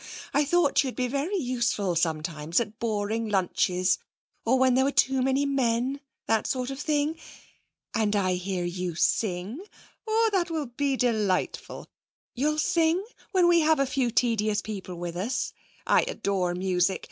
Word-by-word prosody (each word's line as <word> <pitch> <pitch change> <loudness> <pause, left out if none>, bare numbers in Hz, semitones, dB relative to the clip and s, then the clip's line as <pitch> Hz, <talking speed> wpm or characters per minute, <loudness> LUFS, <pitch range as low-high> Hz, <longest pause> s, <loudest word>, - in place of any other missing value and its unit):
I 290 - +3
thought 310 -2 +3
you'd 260 -2 -4
be 250 -1 0
very 285 +10 -1
useful 235 - 0
sometimes 160 -1 0
at 220 -2 -5
boring 220 0 -1
lunches, 185 -1 +1 0.4
or 250 +3 +3
when 260 -1 +4
there 260 +1 +4
were 280 - +1
too 265 -1 +2
many 270 +2 +2
men 265 0 0 0.2
that 225 -1 +1
sort 255 0 -2
of 270 - -6
thing. 300 +1 0 0.7
And 215 -2 +1
I 185 -2 +2
hear 180 0 -2
you 175 -1 -3
sing. 200 - 0 0.4
Oh, 450 +1 +3
that 365 -3 +1
will 315 -3 -2
be 275 +3 -1
delightful! 215 -7 -1 0.5
You'll 300 +4 0
sing 335 +3 +2 0.3
when 370 -3 +4
we 345 -1 +5
have 315 0 +3
a 275 - +3
few 265 -2 0
tedious 220 -3 +1
people 195 -4 -6
with 175 0 -5
us? 205 +9 -2 0.3
I - - +4
adore 190 - -1
music. 185 0 +1
235 Hz, 160 wpm, -27 LUFS, 190-280 Hz, 0.7 s, we